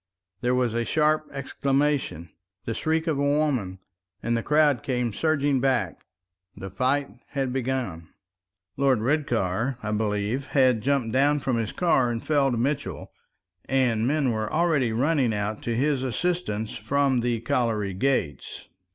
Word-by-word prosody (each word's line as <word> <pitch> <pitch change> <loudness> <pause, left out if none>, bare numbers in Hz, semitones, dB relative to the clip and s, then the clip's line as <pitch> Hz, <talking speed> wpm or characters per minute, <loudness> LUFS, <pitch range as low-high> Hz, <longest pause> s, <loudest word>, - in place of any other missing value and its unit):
There 125 +1 +1
was 125 -3 +1
a 115 0 0
sharp 155 +3 +1
exclamation, 140 - -1 0.3
the 115 - -2
shriek 160 +6 0
of 155 -5 0
a - - +1 0.2
woman, 125 -12 0 0.5
and 120 0 0
the 115 - 0
crowd 150 -2 +3
came 125 -3 -1
surging 145 0 +1
back. 125 -13 -1 0.5
The 95 -1 -7
fight 130 +7 0 0.2
had 135 -3 -2
begun. 125 -11 -3 0.7
Lord 135 -2 +3
Redcar, 120 -3 0
I 110 - -2
believe, 105 +5 -1
had 130 -4 +4
jumped 135 -2 0
down 145 +4 +3
from 130 -3 0
his 115 -2 -2
car 135 -8 +2
and 115 -1 -4
felled 140 -5 +2
Mitchell, 135 +4 -2 0.5
and 125 -4 +1
men 140 -2 +1
were 110 -1 -2
already 155 -7 +2
running 130 -1 +1
out 105 +1 -3
to 115 - -1
his 140 +2 +1
assistance 130 -5 -2
from 135 +3 +1
the 120 -1 -1
colliery 115 -5 0
gates. 95 - -2
130 Hz, 145 wpm, -25 LUFS, 110-140 Hz, 0.7 s, had